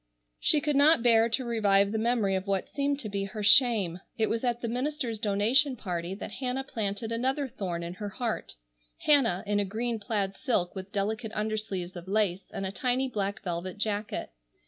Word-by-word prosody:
She 300 Hz, -, +3 dB
could 295 Hz, -1 st, 0 dB
not 285 Hz, -2 st, +6 dB
bear 230 Hz, -1 st, +5 dB
to 250 Hz, +3 st, 0 dB
revive 200 Hz, -4 st, +3 dB
the 220 Hz, -, -1 dB
memory 225 Hz, -4 st, +1 dB
of 190 Hz, +1 st, -2 dB
what 195 Hz, -1 st, 0 dB
seemed 280 Hz, 0 st, -1 dB
to 220 Hz, -, -5 dB
be 200 Hz, 0 st, -2 dB
her 210 Hz, +2 st, -6 dB
shame. 205 Hz, -6 st, +5 dB, 0.2 s
It 220 Hz, -, +1 dB
was 230 Hz, +2 st, -1 dB
at 240 Hz, -1 st, 0 dB
the 235 Hz, -, -2 dB
minister's 250 Hz, -1 st, -2 dB
donation 230 Hz, +7 st, +2 dB
party 180 Hz, -4 st, -4 dB
that -, -, -7 dB
Hannah 260 Hz, 0 st, -2 dB
planted 220 Hz, -3 st, -3 dB
another 265 Hz, +4 st, 0 dB
thorn 180 Hz, -8 st, -4 dB
in 170 Hz, +1 st, -5 dB
her 205 Hz, +2 st, -6 dB
heart,—Hannah, 190 Hz, -, -1 dB
in 205 Hz, 0 st, +1 dB
a -, -, +2 dB
green 225 Hz, +3 st, -2 dB
plaid 200 Hz, -2 st, -2 dB
silk 200 Hz, -10 st, 0 dB
with 190 Hz, 0 st, -8 dB
delicate 215 Hz, +3 st, -2 dB
undersleeves 210 Hz, -4 st, -3 dB
of 175 Hz, +1 st, -9 dB
lace, 195 Hz, -2 st, 0 dB
and 195 Hz, -2 st, -4 dB
a 190 Hz, -, -3 dB
tiny 255 Hz, +5 st, 0 dB
black 200 Hz, -3 st, -3 dB
velvet 180 Hz, +1 st, -4 dB
jacket. 210 Hz, 0 st, -2 dB
215 Hz, 190 wpm, -28 LUFS, 195-245 Hz, 0.2 s, not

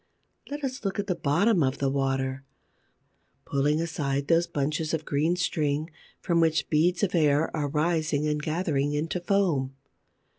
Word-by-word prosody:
Let 290 Hz, +1 st, -5 dB
us 260 Hz, -2 st, -4 dB
look 195 Hz, -2 st, -2 dB
at 205 Hz, -, -1 dB
the 190 Hz, -, 0 dB
bottom 170 Hz, +5 st, +2 dB
of 130 Hz, -2 st, +1 dB
the 135 Hz, -1 st, 0 dB
water, 135 Hz, -1 st, -1 dB, 1.0 s
pulling 145 Hz, +2 st, +1 dB
aside 140 Hz, -4 st, -2 dB
those 170 Hz, +1 st, +3 dB
bunches 155 Hz, +3 st, -1 dB
of 155 Hz, -1 st, -6 dB
green 155 Hz, +5 st, +1 dB
string 155 Hz, -3 st, -1 dB, 0.3 s
from 170 Hz, -1 st, +1 dB
which 160 Hz, -1 st, +1 dB
beads 170 Hz, +5 st, +2 dB
of 195 Hz, -, +1 dB
air 155 Hz, -2 st, +2 dB
are 150 Hz, -2 st, -1 dB
rising 155 Hz, -1 st, 0 dB
and 150 Hz, 0 st, -1 dB
gathering 155 Hz, -3 st, -1 dB
into 160 Hz, +4 st, -1 dB
foam. 175 Hz, -8 st, 0 dB
155 Hz, 155 wpm, -27 LUFS, 145-175 Hz, 1.0 s, those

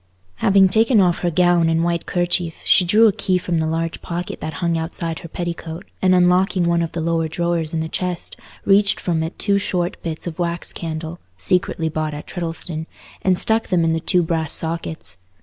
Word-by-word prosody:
Having 195 Hz, -1 st, +4 dB
taken 225 Hz, +3 st, +3 dB
off 180 Hz, -3 st, +3 dB
her 175 Hz, -, 0 dB
gown 175 Hz, 0 st, +3 dB
and 165 Hz, 0 st, +1 dB
white 170 Hz, -1 st, -1 dB
kerchief, 175 Hz, -1 st, 0 dB
she -, -, +5 dB
drew 210 Hz, +6 st, +5 dB
a -, -, +4 dB
key 195 Hz, -2 st, 0 dB
from 175 Hz, -2 st, -1 dB
the 160 Hz, -, 0 dB
large 165 Hz, +1 st, -2 dB
pocket 175 Hz, +1 st, -5 dB
that 155 Hz, -, -4 dB
hung 170 Hz, 0 st, -1 dB
outside 165 Hz, 0 st, -3 dB
her 170 Hz, -, -9 dB
petticoat, 170 Hz, 0 st, -5 dB, 0.2 s
and, 185 Hz, -1 st, +4 dB
unlocking 180 Hz, +1 st, +3 dB
one 170 Hz, 0 st, +2 dB
of 165 Hz, -, -3 dB
the 170 Hz, -, -3 dB
lower 165 Hz, 0 st, 0 dB
drawers 170 Hz, -1 st, -1 dB
in 165 Hz, -2 st, -1 dB
the 160 Hz, -, -3 dB
chest, 180 Hz, +1 st, -4 dB, 0.3 s
reached 200 Hz, +1 st, +4 dB
from 165 Hz, -3 st, -1 dB
it 160 Hz, +2 st, -4 dB
two 200 Hz, -1 st, +1 dB
short 180 Hz, -3 st, -2 dB
bits 160 Hz, -2 st, -4 dB
of 170 Hz, -2 st, -6 dB
wax 170 Hz, 0 st, -2 dB
candle—secretly 160 Hz, -, -3 dB
bought 155 Hz, -1 st, -3 dB
at 150 Hz, -, -8 dB
Treddleston—and 170 Hz, +1 st, -3 dB
stuck 220 Hz, +4 st, +1 dB
them 175 Hz, -2 st, +2 dB
in 165 Hz, 0 st, +2 dB
the 165 Hz, -, 0 dB
two 175 Hz, +2 st, +2 dB
brass 160 Hz, -1 st, -1 dB
sockets. 160 Hz, 0 st, -2 dB
170 Hz, 195 wpm, -20 LUFS, 160-180 Hz, 0.3 s, she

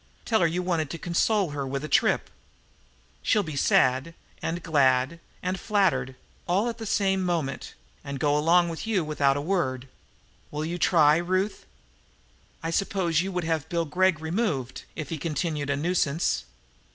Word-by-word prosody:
Tell 220 Hz, -2 st, +2 dB
her 170 Hz, -, +4 dB
you 175 Hz, +3 st, -2 dB
want 165 Hz, -5 st, 0 dB
to 165 Hz, -, -5 dB
console 180 Hz, +2 st, +1 dB
her 140 Hz, -2 st, -3 dB
with 135 Hz, +2 st, -3 dB
a -, -, -3 dB
trip. 140 Hz, -, +2 dB, 0.9 s
She'll 210 Hz, -2 st, +2 dB
be 155 Hz, -4 st, -6 dB
sad 130 Hz, +3 st, +2 dB, 0.3 s
and 170 Hz, +1 st, -3 dB
glad 140 Hz, -1 st, +2 dB, 0.2 s
and 185 Hz, +1 st, -2 dB
flattered, 170 Hz, -, +1 dB, 0.3 s
all 195 Hz, +6 st, +2 dB
in 235 Hz, -, -1 dB
the 225 Hz, -, -5 dB
same 195 Hz, -2 st, +1 dB
moment, 165 Hz, -7 st, -2 dB, 0.3 s
and 140 Hz, -1 st, -5 dB
go 145 Hz, -1 st, +2 dB
along 170 Hz, +3 st, +4 dB
with 165 Hz, +6 st, -6 dB
you 205 Hz, -6 st, +1 dB
without 145 Hz, -2 st, +1 dB
a -, -, -2 dB
word. 135 Hz, -9 st, -1 dB, 0.6 s
Will 150 Hz, +1 st, -3 dB
you 175 Hz, +2 st, -4 dB
try, 155 Hz, -3 st, +5 dB
Ruth?" 185 Hz, +4 st, -1 dB, 1.0 s
"I 165 Hz, -, -2 dB
suppose 175 Hz, -3 st, +1 dB
you 190 Hz, +2 st, -3 dB
would 180 Hz, -1 st, -2 dB
have 160 Hz, -2 st, -1 dB
Bill 170 Hz, -1 st, 0 dB
Gregg 180 Hz, +1 st, +2 dB
removed 160 Hz, -, -2 dB
if 155 Hz, -4 st, -5 dB
he 165 Hz, -, -4 dB
continued 150 Hz, -2 st, -2 dB
a 140 Hz, -, +1 dB
nuisance?" 165 Hz, -, 0 dB
165 Hz, 165 wpm, -26 LUFS, 145-185 Hz, 1.0 s, try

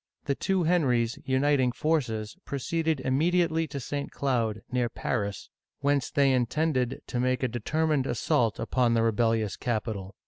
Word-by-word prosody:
The 140 Hz, -, +1 dB
two 190 Hz, +5 st, 0 dB
Henrys, 130 Hz, -9 st, +2 dB
uniting 130 Hz, -1 st, +2 dB
forces, 120 Hz, -6 st, -1 dB
proceeded 160 Hz, +2 st, -1 dB
immediately 165 Hz, +4 st, +1 dB
to 140 Hz, 0 st, -5 dB
St. 140 Hz, +3 st, -4 dB
Cloud, 115 Hz, -6 st, -1 dB
near 125 Hz, -1 st, +1 dB
Paris, 100 Hz, -4 st, -3 dB, 0.3 s
whence 140 Hz, -1 st, +1 dB
they 140 Hz, -2 st, +3 dB
intended 130 Hz, +1 st, 0 dB
to 125 Hz, -, -3 dB
make 130 Hz, +1 st, +1 dB
a -, -, +3 dB
determined 145 Hz, +4 st, 0 dB
assault 115 Hz, -1 st, +1 dB
upon 120 Hz, 0 st, +1 dB
the 115 Hz, -, +3 dB
rebellious 115 Hz, -3 st, +1 dB
capital. 110 Hz, -4 st, -3 dB
130 Hz, 140 wpm, -28 LUFS, 115-145 Hz, 0.3 s, they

